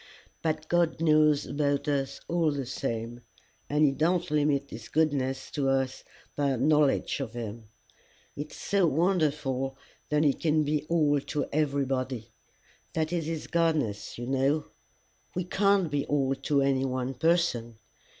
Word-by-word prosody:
"But 155 -1 -2
God 170 -1 +1
knows 155 -2 +4
about 145 0 -1
us 140 -2 -1
all 170 -2 +2
the 140 -2 -3
same, 120 -2 -4 0.5
and 150 +1 +3
he 140 - +4
don't 165 +4 0
limit 145 -2 +1
his 110 0 -9
goodness 135 -4 0
to 140 -3 0
us 135 -1 0 0.3
by 145 -1 +1
our - - -2
knowledge 150 +2 +2
of 130 -5 -4
him. 115 -1 -6 0.7
It's 150 +1 -6
so 195 -3 +1
wonderful 150 -5 0 0.3
that 150 0 +2
he 145 -3 +4
can 155 0 +1
be 150 0 -1
all 150 -4 +3
to 145 +2 -3
everybody! 135 -5 -1 0.6
That 160 +1 -1
is 165 -3 -1
his 160 -2 -3
Godness, 155 -11 0
you 120 - -5
know. 135 +4 +1 0.7
We 180 - 0
can't 195 -2 +2
be 145 -1 -1
all 135 -2 +1
to 140 +1 +1
any 135 -1 +2
one 130 0 -2
person. 160 -9 +1
145 Hz, 150 wpm, -28 LUFS, 135-155 Hz, 0.7 s, knows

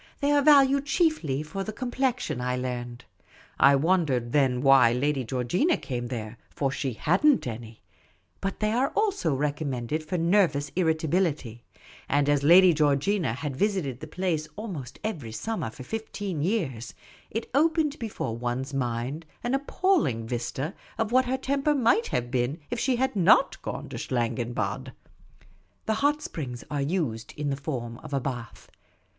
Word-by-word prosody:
They 285 +1 +1
are 290 0 +4
valued 280 -1 +5
chiefly 270 - +1
for 175 +6 -5
the 215 - -4
com 245 +3 -5
plexion, 250 - -1
I 125 0 -1
learned; 125 -1 -5 0.5
I 140 0 +7
wondered 140 -6 +1
then 130 -3 +2
why 135 -4 +6
Lady 135 +2 0
Geoigina 130 - 0
came 125 -3 -4
there 115 -2 -6
— - - -37
for 135 -2 0
she 135 -1 -2
had 170 - 0
n't 300 -3 +5
any; 115 -1 -7 0.6
but 195 +2 -4
they 215 0 +2
are 255 +4 +2
also 395 - +1
recom 150 +2 -1
mended 130 +4 -2
for 160 +4 -3
nervous 165 -5 +2
irritability, 160 -7 0 0.5
and 145 0 +2
as 145 -1 +3
Lady 175 +4 +7
Georgina 150 - +1
had 140 +2 -4
visited 175 - -1
the - - -8
place 170 -5 -2
almost 170 - -6
every 160 - -4
summer 215 - -3
for 120 +4 -10
fifteen 205 - -4
years, 155 - -2 0.3
it 225 +2 -5
opened 305 0 +2
before 215 - -4
one's 125 +4 -3
mind 125 +4 -2 0.2
an 240 +2 -1
appalling 280 - +1
vista 125 - -3 0.2
of 225 0 -1
what 260 +1 +4
her 260 +1 0
tem 275 +1 -1
per 295 +1 +2
might 235 -3 +3
have 120 -1 -2
been 130 +3 0
if 245 - -2
she 260 -2 +1
had 260 -1 0
not 180 -4 +4
gone - - -5
to - - -6
Schlangenbad. 120 -1 -2 0.9
The 220 - +1
hot 295 +1 +2
springs 125 - -5
are 145 -1 -1
used 140 -8 -2
in 145 -1 -1
the - - 0
form 125 -5 -5
of 140 - -5
a - - +2
bath. 120 -4 -6
150 Hz, 165 wpm, -27 LUFS, -, 0.9 s, I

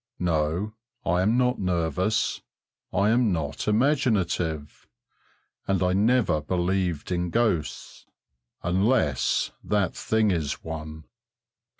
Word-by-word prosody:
No, 85 +4 0 0.3
I 90 +1 +2
am 110 +6 +2
not 125 0 +2
nervous, 90 +3 0 0.5
I 100 +3 +2
am 120 -2 +3
not 80 -2 -3
imaginative, 105 - 0 0.8
and 95 -2 +1
I 90 0 +2
never 105 -5 +2
believed 90 0 -1
in 90 0 0
ghosts, 105 -8 -1 0.6
unless 90 - +1
that 100 -4 0
thing 110 -2 +1
is 80 -5 -2
one. 80 -1 -7
90 Hz, 100 wpm, -26 LUFS, 80-105 Hz, 0.8 s, am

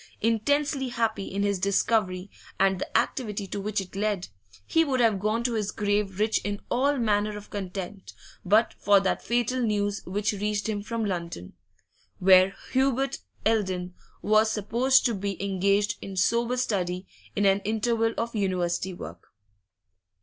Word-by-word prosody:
Intensely 270 +5 +1
happy 225 -4 -1
in 200 +1 -2
his 200 -2 0
discovery 195 -1 +1 0.3
and 190 -1 +3
the - - 0
activity 210 -5 -1
to 200 +1 -5
which 210 +1 -1
it 190 -1 -7
led, 200 -2 -1 0.4
he 325 - +3
would 270 -4 0
have 225 -5 +3
gone 215 +4 0
to 240 -1 0
his 210 -3 -1
grave 205 -1 -1
rich 215 +1 +2
in 205 0 -3
all 280 +3 +2
manner 210 -3 +1
of 210 - -12
content 190 0 -6 0.3
but 215 +5 +3
for 200 -1 +5
that 190 -1 -1
fatal 240 +2 0
news 205 -2 0
which 205 +3 0
reached 205 0 -2
him 210 -2 -2
from 225 +1 -3
London, 170 - -4 0.6
where 185 +1 +6 0.2
Hubert 270 0 +1 0.3
Eldon 185 -5 0 0.3
was 215 +1 +4
sup 210 -2 -4
posed 260 +3 +4
to 240 - +2
be 200 -1 -3
engaged 200 +1 +1
in 195 -1 -7
sober 235 +6 +2
study 185 -6 -1 0.3
in 205 - +1
an 195 0 +4
interval 225 +2 0
of 230 0 -2
University 185 -2 -1
work. - - -10
205 Hz, 155 wpm, -27 LUFS, 195-230 Hz, 0.6 s, where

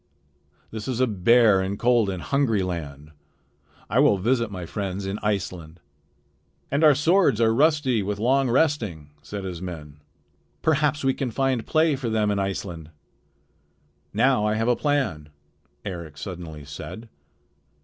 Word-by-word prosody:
This 110 -1 -6
is 125 -2 -2
a 130 - +4
bare 110 -1 +4
and 95 +1 -3
cold 120 -4 +3
and 95 -3 -4
hungry 125 -8 +1
land. 75 -5 -6 0.8
I - - +1
will 100 - +5
visit 115 +3 +1
my 90 -3 -6
friends 100 +1 -4
in 95 +2 -3
Iceland." 90 -5 -3 0.9
"And 140 +3 +1
our 150 -2 +7
swords 155 - +3
are 115 -1 +3
rusty 145 -3 +2
with 100 +1 -3
long 130 +4 +2
resting," 115 - 0
said 100 -1 -7
his 90 -3 -6
men. 75 -5 -8 0.6
"Perhaps 150 -2 +1
we 135 0 +2
can 130 -1 -3
find 130 0 -1
play 155 -1 +3
for 130 -3 -4
them 110 -2 +1
in 100 - 0
Iceland." 90 -5 -4 1.2
"Now 125 +1 +2
I 105 0 +1
have 115 +1 0
a 125 - +3
plan," 130 - -1 0.6
Eric 85 -6 -7
suddenly 85 -6 -8
said. 75 +10 -8
105 Hz, 150 wpm, -24 LUFS, 90-130 Hz, 1.2 s, our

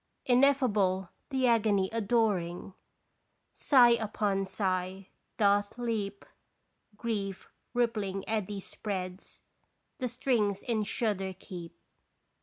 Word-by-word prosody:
Ineffable 240 -9 +3 0.2
the 265 -2 +1
agony 215 -5 +3
adoring, 205 -6 0 0.8
Sigh 250 -4 +6
upon 210 -4 0
sigh 190 -1 -2 0.3
doth 205 +1 +2
leap, 215 -4 -3 0.7
Grief 205 -4 -3 0.3
rippling 210 -5 0
eddy 210 -2 -2
spreads, 185 -2 -6 0.6
The 255 - -1
strings 230 -5 0
in 225 -3 0
shudder 200 -3 -1
keep. 175 -3 -9
205 Hz, 85 wpm, -30 LUFS, 190-230 Hz, 0.8 s, Sigh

